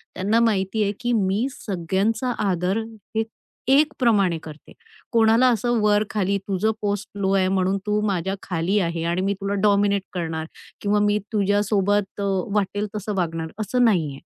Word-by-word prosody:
त्यांना 205 +5 +2
माहिती 215 -2 +1
आहे 200 - +1
की 245 0 -1
मी 210 +3 +1
सगळ्यांचा 205 +4 -1 0.2
आदर 180 +4 0 0.4
हे 220 - +2 0.5
ए 270 - +6
एक 305 0 +2
प्रमाणे 200 -8 +3
करते. 155 -1 -12 0.4
कोणाला 230 +2 +4
असं 235 +2 0
वर-खाली, 205 -1 +1
तुझं 200 +3 +1
पोस्ट 205 -1 -2
लो 195 -1 +1
आहे 185 -1 +3
म्हणून 190 0 +1
तू 210 0 +1
माझ्या 190 0 -1
खाली 180 +2 -1
आहे 170 -2 -1
आणि 170 +2 0
मी 195 +1 +1
तुला 200 0 -1
डॉमिनेट 200 -1 +3
करणार 160 -3 -3 0.4
किंवा 205 0 +2
मी 205 0 +2
तुझ्यासोबत 205 -1 +1
अ, - - -1 0.3
वाटेल 205 +1 0
तसं 210 0 -3
वागणार, 165 -3 -2
असं 245 +4 +1
नाहीये. 160 -10 +1
200 Hz, 160 wpm, -23 LUFS, 185-215 Hz, 0.5 s, ए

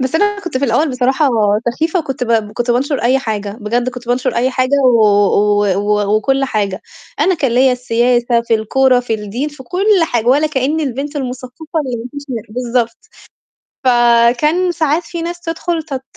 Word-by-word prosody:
بس 260 +3 -2
أنا 410 +3 +1
كنت 345 -8 -4
في 280 - 0
الأول 275 +6 +1
بصراحة 265 +3 +1 0.4
سخيفة 320 +8 -1
وكنت 270 -5 -3
ب 220 -3 0
كنت 240 +2 -2
بانشر 270 +4 0
أي 255 +3 +3
حاجة، 210 -5 -4
بجد 240 +4 -1
كنت 250 -1 -8
بانشر 250 +1 0
أي 250 +2 +1
حاجة 255 +2 +1
و 245 -3 +4
و 205 0 +3
و 205 0 +1
وكل 270 +5 +1
حاجة. 205 -4 -2 0.4
أنا 375 - +3
كان 275 -6 -1
ليّا 255 +2 +4
السياسة، 240 -1 +1
في 235 -1 0
الكورة، 250 +4 +2
في 245 -2 -2
الدين، 220 +7 -4
في 290 -2 -12
كل 360 +10 -3 0.2
حاجة، 240 -7 -1
ولا 285 +5 +4
كأني 300 +2 -1
البنت 280 +2 -4
المثقفة 260 +5 -5
اللي 250 -2 -3
ما 235 +2 -7
فيش 285 0 -8
منها 235 -4 -4
بالضبط 235 0 -2 0.9
فكان 245 +8 +3
ساعات 315 0 0
في 340 -1 -6
ناس 345 +1 -5
تدخل 330 0 -3
تت 275 -4 -6
255 Hz, 180 wpm, -16 LUFS, 235-290 Hz, 0.9 s, و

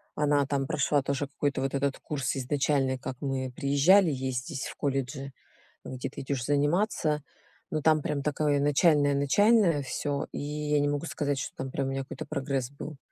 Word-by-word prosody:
она 145 -1 +2
там 140 -1 -1
прошла 145 -1 +1
тоже, 140 +1 -2
какой-то, 140 -1 -2
вот 135 0 -1
этот 140 0 0
курс, 145 -2 -2
изначальный, 135 0 +1
как 130 0 -6
мы 130 -2 -2
приезжали, 160 +7 +5
есть 130 -1 -2
здесь 140 -5 -4
в - - -8
колледже, 135 0 -2 0.5
где 130 -1 -5
ты - - -8
идешь 135 -2 -2
заниматься, 150 +1 +1 0.5
но 155 -1 -1
там 155 0 +4
прям 140 -1 -2
такое, 150 -1 +1
начальное-начальное 145 +5 +4
всё, 145 +2 -2
и - - -4
я 150 0 -1
не 145 0 +2
могу 145 +3 -2
сказать, 145 -4 -2
что, - - -5
там, 130 0 -5
прям, 135 0 -1
у - - -2
нее 135 0 -2
какой-то - - -7
прогресс 135 -2 -2
был. 145 +1 -8
140 Hz, 180 wpm, -28 LUFS, 135-150 Hz, 0.5 s, приезжали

